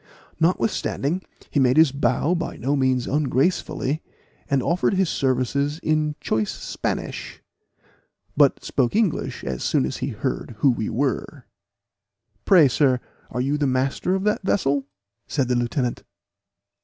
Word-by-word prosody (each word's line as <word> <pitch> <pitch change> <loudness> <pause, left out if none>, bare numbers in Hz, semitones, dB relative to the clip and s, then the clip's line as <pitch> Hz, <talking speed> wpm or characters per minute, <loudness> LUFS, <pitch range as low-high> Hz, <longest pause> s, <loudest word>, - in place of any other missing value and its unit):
Notwithstanding, 175 -1 0 0.3
he 145 - +1
made 130 0 +3
his 160 -3 +6
bow 145 +4 +1
by 170 -1 -3
no 140 +4 0
means 130 -2 +1
ungracefully, 145 +1 0 0.5
and 135 -3 +2
offered 180 +3 +1
his 190 -2 +2
services 135 +3 0
in 155 -1 +1
choice 110 -1 -1
Spanish, - - -4 1.0
but 145 -2 +4
spoke 125 +2 0
English 215 -7 0
as 65 -2 -3
soon - - +2
as - - -4
he - - -3
heard 120 - -4
who 140 - +5
we 110 -3 -2
were. 130 +1 -2 1.0
"Pray, 175 -7 +7
sir, 130 -1 +2 0.3
are 125 - -2
you 140 +3 0
the 145 - +2
master 135 +8 0
of 190 - -2
that 210 0 +1
vessel?" 140 -8 0 0.4
said 135 -4 -1
the 125 - +2
lieutenant. 120 +1 -1
140 Hz, 140 wpm, -23 LUFS, 130-160 Hz, 1.0 s, Pray